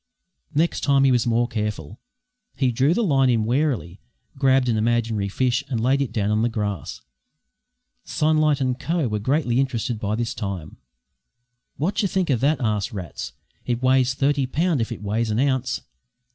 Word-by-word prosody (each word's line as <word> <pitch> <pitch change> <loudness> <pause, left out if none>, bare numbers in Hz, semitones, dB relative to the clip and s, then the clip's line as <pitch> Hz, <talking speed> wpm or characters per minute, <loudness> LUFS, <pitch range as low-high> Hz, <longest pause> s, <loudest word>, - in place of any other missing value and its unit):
Next 165 +3 +1
time 140 -1 +3
he 135 - +5
was 120 -2 +2
more 120 +1 +2
careful. 105 -5 -4 0.6
He 130 -2 +1
drew 135 +8 +2
the 235 - +1
line 135 -8 +3
in 115 -3 +2
warily, 120 - -1 0.4
grabbed 135 -1 +3
an 115 - +2
imaginary 110 -2 0
fish 125 +4 0
and 125 -5 -1
laid 130 +4 +2
it 140 - -2
down 105 -1 0
on 105 0 +2
the 120 - +2
grass. 105 - -4 1.0
Sunlight 155 -2 +2
and 130 -1 -1
Co. 165 -4 0
were 105 -1 -2
greatly 130 +1 +1
interested 120 -3 -1
by 105 0 -1
this 120 +2 -2
time. 95 -7 -5 1.0
"Wot 185 +9 0
yer 200 - +1
think 185 -4 0
o' - - +4
that?" 140 +6 +1
asked 105 -4 -1
Rats. 95 -5 -6 0.3
"It 120 0 -1
weighs 130 0 +3
thirty 140 0 +1
pound 160 0 0
if 115 - -2
it - - -6
weighs 110 +3 -1
an 105 - 0
ounce! 130 -2 0
125 Hz, 175 wpm, -23 LUFS, 110-140 Hz, 1.0 s, he